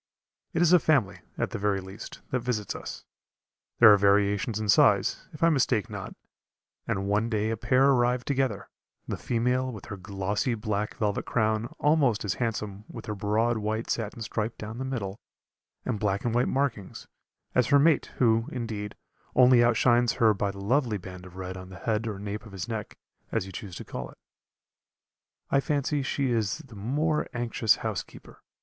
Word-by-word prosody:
It 170 Hz, 0 st, +2 dB
is 175 Hz, +1 st, +5 dB
a 180 Hz, -, +8 dB
family, 115 Hz, -, +2 dB, 0.2 s
at -, -, -1 dB
the -, -, -4 dB
very 100 Hz, -1 st, +1 dB
least, 95 Hz, +2 st, -9 dB
that 130 Hz, -, +1 dB
visits 115 Hz, -4 st, -2 dB
us. -, -, -8 dB, 0.7 s
There 110 Hz, -3 st, +9 dB
are -, -, +6 dB
variations 100 Hz, +2 st, +2 dB
in 110 Hz, -, -3 dB
size, 100 Hz, -1 st, +4 dB
if 155 Hz, -1 st, -6 dB
I 165 Hz, -, +6 dB
mistake 125 Hz, -, +1 dB
not, -, -, -6 dB, 0.7 s
and 95 Hz, 0 st, -1 dB
one 105 Hz, +3 st, +1 dB
day 110 Hz, -1 st, 0 dB
a -, -, 0 dB
pair 130 Hz, +4 st, +3 dB
arrived 125 Hz, -2 st, +2 dB
together; 130 Hz, -7 st, -1 dB, 0.4 s
the -, -, -2 dB
female 125 Hz, +2 st, 0 dB
with 110 Hz, -5 st, -9 dB
her 100 Hz, -, -7 dB
glossy 100 Hz, +5 st, -2 dB
black 105 Hz, -1 st, -2 dB
velvet 105 Hz, -2 st, -1 dB
crown 110 Hz, 0 st, +1 dB
almost 145 Hz, -8 st, +2 dB
as 100 Hz, -, 0 dB
handsome 105 Hz, -3 st, -2 dB
with -, -, -8 dB
her 105 Hz, -, -3 dB
broad 110 Hz, +3 st, +1 dB
white 110 Hz, +2 st, -2 dB
satin 115 Hz, 0 st, -3 dB
stripe 110 Hz, +1 st, -3 dB
down 110 Hz, +3 st, -7 dB
the 130 Hz, -, -3 dB
middle, 110 Hz, -6 st, -4 dB, 0.7 s
and 105 Hz, -, -1 dB
black 100 Hz, 0 st, -1 dB
and 120 Hz, -, 0 dB
white 120 Hz, +1 st, +2 dB
markings, 130 Hz, -8 st, -2 dB, 0.5 s
as 125 Hz, -, +3 dB
her 145 Hz, -, +5 dB
mate, 155 Hz, +2 st, +4 dB
who, 115 Hz, -2 st, +3 dB
indeed, 110 Hz, -4 st, -4 dB, 0.4 s
only 125 Hz, -1 st, +7 dB
outshines 120 Hz, 0 st, +3 dB
her 110 Hz, -2 st, +4 dB
by 100 Hz, 0 st, -1 dB
the 100 Hz, -, -7 dB
lovely 115 Hz, +2 st, +1 dB
band 90 Hz, -1 st, -10 dB
of 90 Hz, -, -15 dB
red 95 Hz, 0 st, -5 dB
on 95 Hz, 0 st, -9 dB
the 95 Hz, -, -10 dB
head 110 Hz, +4 st, -1 dB
or 105 Hz, -3 st, -4 dB
nape 105 Hz, +2 st, -6 dB
of 100 Hz, -, -14 dB
his 95 Hz, +3 st, -5 dB
neck, 110 Hz, -3 st, -5 dB, 0.3 s
as -, -, 0 dB
you 95 Hz, -, -9 dB
choose 95 Hz, -1 st, -7 dB
to -, -, -7 dB
call 60 Hz, -1 st, -6 dB
it. -, -, -16 dB, 1.3 s
I 140 Hz, -, +4 dB
fancy 145 Hz, 0 st, 0 dB
she 135 Hz, -1 st, -1 dB
is 110 Hz, -4 st, 0 dB
the 125 Hz, -5 st, -13 dB
more 150 Hz, +9 st, 0 dB
anxious 120 Hz, -2 st, +2 dB
housekeeper. -, -, -6 dB
110 Hz, 185 wpm, -27 LUFS, 100-125 Hz, 1.3 s, There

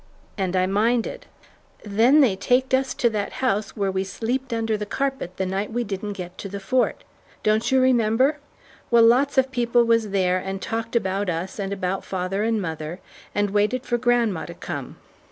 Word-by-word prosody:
And 190 Hz, -3 st, -1 dB
I 185 Hz, 0 st, +3 dB
minded. 230 Hz, -, 0 dB, 0.6 s
"Then 230 Hz, +8 st, +4 dB
they 235 Hz, -9 st, +4 dB
taked 250 Hz, +6 st, +1 dB
us 265 Hz, 0 st, +1 dB
to 240 Hz, -, +2 dB
that 210 Hz, -2 st, -3 dB
house 215 Hz, -5 st, -1 dB
where 200 Hz, -2 st, 0 dB
we 190 Hz, 0 st, -1 dB
sleeped 245 Hz, +7 st, -3 dB
under 225 Hz, -1 st, 0 dB
the 210 Hz, 0 st, -4 dB
carpet 265 Hz, -7 st, -3 dB
the 190 Hz, -, -1 dB
night 195 Hz, +3 st, -2 dB
we 240 Hz, +2 st, -1 dB
didn't 205 Hz, -1 st, -4 dB
get 180 Hz, -2 st, -8 dB
to 195 Hz, -, -6 dB
the 200 Hz, +1 st, -5 dB
Fort. 245 Hz, +6 st, 0 dB, 0.4 s
Don't 215 Hz, +4 st, +2 dB
you 265 Hz, -, +5 dB
remember? 255 Hz, +3 st, +3 dB, 0.5 s
Well, 235 Hz, -1 st, +6 dB
lots 260 Hz, +5 st, +4 dB
of 265 Hz, 0 st, +3 dB
people 240 Hz, -1 st, +2 dB
was 230 Hz, -2 st, +2 dB
there 185 Hz, -2 st, +1 dB
and 190 Hz, +1 st, -4 dB
talked 225 Hz, +3 st, -4 dB
about 195 Hz, -2 st, 0 dB
us 180 Hz, +5 st, -4 dB
and 195 Hz, -1 st, -3 dB
about 190 Hz, -1 st, -2 dB
father 190 Hz, +1 st, -2 dB
and 225 Hz, 0 st, +1 dB
mother, 160 Hz, -1 st, -5 dB, 0.4 s
and 205 Hz, -1 st, +1 dB
waited 215 Hz, +6 st, +1 dB
for 240 Hz, -3 st, 0 dB
grandma 235 Hz, -7 st, +1 dB
to -, -, -9 dB
come. -, -, -6 dB
215 Hz, 190 wpm, -23 LUFS, 195-245 Hz, 0.6 s, Well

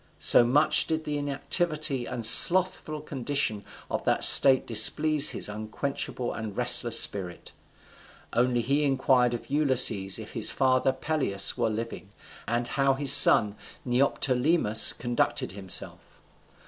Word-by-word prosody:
So -, -, +4 dB
much 145 Hz, +6 st, +2 dB
did 160 Hz, 0 st, -4 dB
the 150 Hz, -1 st, -6 dB
inactivity 145 Hz, -1 st, -3 dB
and 115 Hz, -2 st, -6 dB
slothful 155 Hz, +2 st, +4 dB
condition 135 Hz, -7 st, -5 dB, 0.2 s
of -, -, -6 dB
that -, -, -2 dB
state 135 Hz, -2 st, +6 dB
displease 145 Hz, +7 st, +3 dB
his -, -, -4 dB
unquenchable 110 Hz, +4 st, -7 dB
and 110 Hz, -2 st, -9 dB
restless 120 Hz, -1 st, +2 dB
spirit. 90 Hz, -4 st, -6 dB, 0.8 s
Only 120 Hz, 0 st, -1 dB
he 140 Hz, +5 st, -3 dB
inquired 130 Hz, -3 st, -1 dB
of 120 Hz, -, -12 dB
Ulysses 125 Hz, -10 st, +1 dB
if -, -, -11 dB
his -, -, +2 dB
father 130 Hz, 0 st, -1 dB
Peleus 130 Hz, -8 st, -1 dB
were -, -, -3 dB
living, 110 Hz, -4 st, -8 dB, 0.4 s
and 120 Hz, +1 st, -4 dB
how 135 Hz, -1 st, -2 dB
his 140 Hz, 0 st, +4 dB
son 105 Hz, -7 st, +5 dB, 0.3 s
Neoptolemus 125 Hz, -1 st, 0 dB
conducted 120 Hz, 0 st, -4 dB
himself. 95 Hz, -1 st, -7 dB
130 Hz, 125 wpm, -24 LUFS, 115-145 Hz, 0.8 s, state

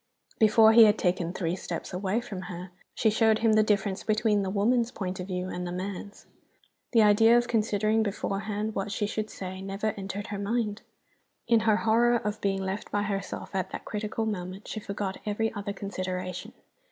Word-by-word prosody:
Before 220 Hz, 0 st, +6 dB
he 230 Hz, 0 st, +9 dB
had 210 Hz, 0 st, +4 dB
taken 175 Hz, -2 st, 0 dB
three 175 Hz, -2 st, -2 dB
steps 175 Hz, -2 st, -6 dB
away 190 Hz, +5 st, 0 dB
from 195 Hz, -6 st, -7 dB
her 180 Hz, +1 st, -7 dB, 0.2 s
she 220 Hz, -, +3 dB
showed 220 Hz, 0 st, +4 dB
him 220 Hz, -, +5 dB
the 215 Hz, -, +5 dB
difference 205 Hz, -2 st, 0 dB
between 215 Hz, -1 st, +2 dB
the 195 Hz, -, -2 dB
woman's 230 Hz, +4 st, +2 dB
point 190 Hz, -6 st, -5 dB
of 180 Hz, -, -5 dB
view 180 Hz, -1 st, -3 dB
and 180 Hz, -1 st, -4 dB
the -, -, -4 dB
man's. 195 Hz, +2 st, -6 dB, 0.7 s
The 230 Hz, -3 st, +5 dB
idea 225 Hz, +3 st, +6 dB
of 240 Hz, 0 st, +1 dB
considering 215 Hz, -1 st, +1 dB
beforehand 210 Hz, +1 st, -2 dB
what 200 Hz, 0 st, -3 dB
she 205 Hz, +1 st, -1 dB
should 215 Hz, +1 st, -3 dB
say 185 Hz, 0 st, -7 dB
never 195 Hz, +2 st, -2 dB
entered 195 Hz, +1 st, -5 dB
her 200 Hz, -, -3 dB
mind. 210 Hz, 0 st, -1 dB, 0.7 s
In 230 Hz, -1 st, +5 dB
her 215 Hz, -, +5 dB
horror 235 Hz, +2 st, +3 dB
of 210 Hz, -2 st, -2 dB
being 195 Hz, -1 st, 0 dB
left 190 Hz, +2 st, -4 dB
by 205 Hz, 0 st, 0 dB
herself 200 Hz, -1 st, -4 dB
at 190 Hz, -1 st, -1 dB
that -, -, -7 dB
critical 215 Hz, +1 st, -3 dB
moment, 190 Hz, -2 st, -5 dB
she 215 Hz, -, -4 dB
forgot 200 Hz, -2 st, -4 dB
every 220 Hz, +1 st, -1 dB
other 205 Hz, -1 st, -4 dB
consideration. 185 Hz, -2 st, -5 dB
205 Hz, 190 wpm, -28 LUFS, 190-220 Hz, 0.7 s, he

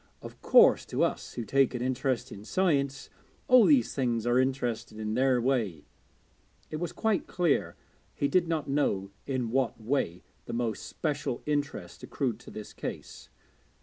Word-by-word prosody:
Of -, -, -11 dB
course, -, -, +6 dB
to -, -, 0 dB
us -, -, -2 dB
who 120 Hz, -, -4 dB
take 135 Hz, 0 st, +2 dB
an 120 Hz, -, -3 dB
interest 130 Hz, 0 st, -1 dB
in 100 Hz, -, -9 dB
science, 140 Hz, -, 0 dB, 0.4 s
all 250 Hz, -4 st, +7 dB
these 280 Hz, -5 st, +4 dB
things 120 Hz, -4 st, 0 dB
are 120 Hz, +1 st, +3 dB
interesting 125 Hz, -4 st, -1 dB
in 110 Hz, 0 st, -3 dB
their 130 Hz, +1 st, +3 dB
way.' 115 Hz, -, -1 dB, 0.9 s
It 155 Hz, -, -3 dB
was 175 Hz, +1 st, -3 dB
quite 220 Hz, -3 st, 0 dB
clear 175 Hz, -5 st, 0 dB, 0.4 s
he 140 Hz, -, +1 dB
did 175 Hz, +2 st, +2 dB
not 160 Hz, -3 st, -1 dB
know 100 Hz, -9 st, 0 dB, 0.2 s
in 130 Hz, -4 st, -2 dB
what 130 Hz, -2 st, 0 dB
way 110 Hz, -7 st, -1 dB, 0.2 s
the -, -, -6 dB
most 115 Hz, -2 st, -2 dB
special 145 Hz, -5 st, -3 dB
interest 145 Hz, 0 st, -3 dB
accrued 120 Hz, -6 st, -2 dB
to 120 Hz, -, -13 dB
this 110 Hz, -, -9 dB
case. -, -, -7 dB
130 Hz, 160 wpm, -29 LUFS, 115-145 Hz, 0.9 s, all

